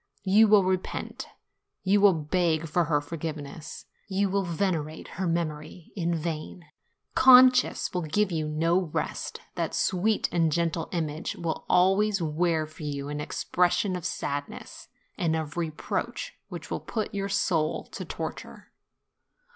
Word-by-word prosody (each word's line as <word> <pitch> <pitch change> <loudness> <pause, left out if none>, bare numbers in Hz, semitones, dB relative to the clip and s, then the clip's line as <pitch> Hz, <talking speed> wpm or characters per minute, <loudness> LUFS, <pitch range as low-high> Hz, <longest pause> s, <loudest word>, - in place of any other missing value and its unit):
You 210 +4 +6
will 205 -2 +6
repent, 185 0 -3 0.6
you 200 +1 +3
will 200 -3 +6
beg 165 +1 0
for 170 +2 +1
her 150 -2 +1
forgive 160 +1 -5
ness, 145 +2 -9 0.2
you 195 -1 0
will 200 0 +2
venerate 170 -4 -2
her 185 0 -3
memory 160 0 -3
in 170 -3 0
vain; 165 +1 -5 0.5
conscience 255 -1 +6
will 180 - 0
give 185 +5 0
you 155 -2 -1
no 165 +4 +1
rest; 155 - -4
that - - -2
sweet 200 +4 +1
and 165 -2 +2
gentle 165 +1 -1
image 160 -2 -3
will 165 -2 -4
always 195 +3 +3
wear 160 0 0
for 155 +1 -14
you 145 -1 -4
an 150 0 -3
expression 180 +5 0
of 180 - -5
sadness 145 -4 -5 0.3
and 165 -2 +1
of 155 -2 -4
reproach 170 - -3 0.2
which - - -8
will - - -1
put 220 0 -4
your 200 0 -2
soul 160 -5 0
to - - -6
torture. - - -7
170 Hz, 145 wpm, -27 LUFS, 155-190 Hz, 0.6 s, You